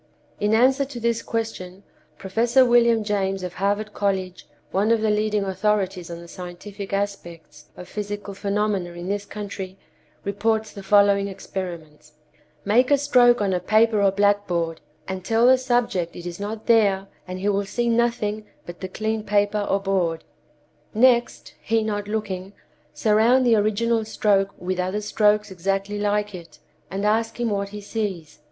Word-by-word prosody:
In 210 Hz, +1 st, +2 dB
answer 260 Hz, +4 st, +4 dB
to 270 Hz, -3 st, -7 dB
this 235 Hz, 0 st, 0 dB
question, 200 Hz, -5 st, -5 dB, 0.3 s
Professor 235 Hz, -, +3 dB
William 235 Hz, -2 st, +4 dB
James 195 Hz, -2 st, -1 dB
of 180 Hz, -1 st, -5 dB
Harvard 205 Hz, +3 st, -1 dB
College, 190 Hz, -2 st, -2 dB, 0.2 s
one 200 Hz, +3 st, +1 dB
of 230 Hz, -1 st, +3 dB
the 220 Hz, -1 st, +2 dB
leading 210 Hz, -1 st, +1 dB
authorities 195 Hz, -2 st, -1 dB
on 170 Hz, 0 st, -7 dB
the 170 Hz, -, -12 dB
scientific 185 Hz, +3 st, -8 dB
aspects 195 Hz, -5 st, -5 dB
of 180 Hz, -, -9 dB
psychical 205 Hz, -1 st, -5 dB
phenomena 200 Hz, -3 st, -1 dB
in 175 Hz, +2 st, -7 dB
this 200 Hz, 0 st, -2 dB
country, 200 Hz, -2 st, -7 dB, 0.5 s
reports 215 Hz, +2 st, -1 dB
the 200 Hz, -, -8 dB
following 200 Hz, 0 st, +4 dB
experiments: 165 Hz, -6 st, -7 dB, 0.5 s
"Make 240 Hz, +5 st, +3 dB
a 285 Hz, -, +5 dB
stroke 245 Hz, -4 st, +4 dB
on 195 Hz, -2 st, +1 dB
a 180 Hz, -, +1 dB
paper 215 Hz, +3 st, +3 dB
or 200 Hz, -, +5 dB
blackboard, 195 Hz, -5 st, 0 dB, 0.3 s
and 190 Hz, -1 st, -5 dB
tell 225 Hz, +4 st, +2 dB
the 260 Hz, +1 st, +6 dB
subject 240 Hz, -9 st, 0 dB
it 175 Hz, -, -9 dB
is 175 Hz, +1 st, -6 dB
not 210 Hz, +2 st, -5 dB
there, 205 Hz, -4 st, +3 dB, 0.2 s
and 185 Hz, 0 st, -5 dB
he 200 Hz, +2 st, -1 dB
will 200 Hz, 0 st, 0 dB
see 240 Hz, +4 st, -2 dB
nothing 230 Hz, -3 st, 0 dB, 0.2 s
but 175 Hz, 0 st, -9 dB
the 190 Hz, -, -4 dB
clean 220 Hz, +3 st, -3 dB
paper 205 Hz, 0 st, +1 dB
or 195 Hz, -, +2 dB
board. 185 Hz, -5 st, -1 dB, 0.7 s
Next, 240 Hz, +1 st, +2 dB
he 225 Hz, -1 st, +1 dB
not 205 Hz, -1 st, -3 dB
looking, 200 Hz, -3 st, -4 dB, 0.4 s
surround 230 Hz, +4 st, +3 dB
the 235 Hz, -2 st, +5 dB
original 220 Hz, +2 st, +1 dB
stroke 200 Hz, -2 st, +2 dB
with 185 Hz, +1 st, -3 dB
other 185 Hz, +3 st, -1 dB
strokes 210 Hz, 0 st, +2 dB
exactly 195 Hz, +3 st, -2 dB
like 205 Hz, 0 st, 0 dB
it, 170 Hz, -2 st, -11 dB, 0.3 s
and 195 Hz, +2 st, -3 dB
ask 225 Hz, +2 st, 0 dB
him 235 Hz, -2 st, 0 dB
what 200 Hz, -1 st, -2 dB
he 210 Hz, +1 st, -8 dB
sees. 200 Hz, -7 st, -4 dB
205 Hz, 160 wpm, -23 LUFS, 190-220 Hz, 0.7 s, the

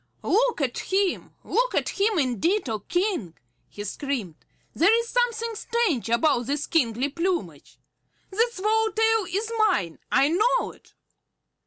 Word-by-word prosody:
"Look 470 Hz, -2 st, +2 dB
at 255 Hz, -3 st, -1 dB
him, 385 Hz, -1 st, 0 dB
look -, -, 0 dB
at -, -, +1 dB
him 405 Hz, 0 st, +1 dB
indeed, 290 Hz, -, +1 dB
O 220 Hz, -2 st, -2 dB
King!" 350 Hz, -, -2 dB, 0.3 s
he 205 Hz, -, -7 dB
screamed. 225 Hz, -, -3 dB, 0.4 s
"There 340 Hz, +6 st, +4 dB
is 465 Hz, 0 st, -4 dB
something 465 Hz, -2 st, 0 dB
strange 435 Hz, -, -1 dB
about 245 Hz, 0 st, +2 dB
his 290 Hz, +1 st, -1 dB
kingly 250 Hz, -4 st, +1 dB
plumage. 345 Hz, +4 st, -3 dB, 0.5 s
That 455 Hz, +5 st, +2 dB
swallow 440 Hz, +2 st, +1 dB
tail 445 Hz, -2 st, +2 dB
is 425 Hz, +5 st, -2 dB
mine, 275 Hz, -, +1 dB
I 275 Hz, -, +4 dB
know 425 Hz, +9 st, +2 dB
it!" -, -, -22 dB
370 Hz, 140 wpm, -25 LUFS, 270-445 Hz, 0.5 s, There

